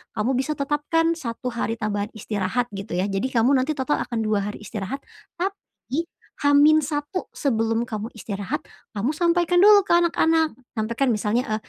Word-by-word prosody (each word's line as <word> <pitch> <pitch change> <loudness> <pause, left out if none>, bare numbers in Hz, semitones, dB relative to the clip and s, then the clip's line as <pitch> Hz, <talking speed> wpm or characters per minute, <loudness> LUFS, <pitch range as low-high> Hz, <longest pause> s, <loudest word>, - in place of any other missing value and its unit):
kamu 215 +4 0
bisa 270 +3 -1
tetapkan 295 +3 0 0.2
1 230 +2 -4
hari 230 -1 -2
tambahan 210 -1 -2
istirahat 210 +2 -1
gitu, 195 -2 -5
ya. 180 +2 +1
Jadi 195 +6 0
kamu 235 +4 +4
nanti 260 +4 0
total 280 +2 0
akan 235 -3 -3
2 215 -1 +1
hari 210 - -7
istirahat. 215 +6 -5 0.3
Tapi 345 -4 -4 0.3
H-1 290 +3 +2
sebelum 225 -3 0
kamu 215 0 -5
istirahat, 200 -3 -4 0.3
kamu 230 +9 -1
sampaikan 345 +1 +2
dulu 410 -1 +7
ke - - +4
anak-anak. 325 -2 +3 0.2
Sampaikan 230 +4 0
misalnya 210 +4 0
e 215 - 0
250 Hz, 155 wpm, -23 LUFS, 215-310 Hz, 0.3 s, dulu